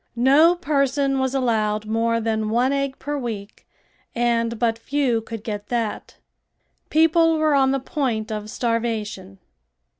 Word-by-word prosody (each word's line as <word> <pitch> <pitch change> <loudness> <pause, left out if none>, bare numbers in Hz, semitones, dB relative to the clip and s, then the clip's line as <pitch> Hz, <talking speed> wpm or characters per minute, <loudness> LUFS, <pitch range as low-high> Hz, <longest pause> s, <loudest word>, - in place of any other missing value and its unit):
No 280 +8 +5
person 275 -4 0
was 265 0 -1
allowed 215 -4 0
more 230 +1 0
than 220 -1 -1
one 245 +4 +2
egg 275 -1 -2
per 290 +1 -4
week 215 -5 -7 0.5
and 235 -1 0
but 230 0 0
few 260 -3 0
could 225 -1 -8
get 210 -2 -5
that. 230 -3 -3 0.7
People 325 +1 +4
were 310 -1 +2
on 270 -1 +4
the 270 0 +1
point 250 -7 -2
of 210 0 -5
starvation. 215 -5 -3
240 Hz, 140 wpm, -22 LUFS, 220-275 Hz, 0.7 s, No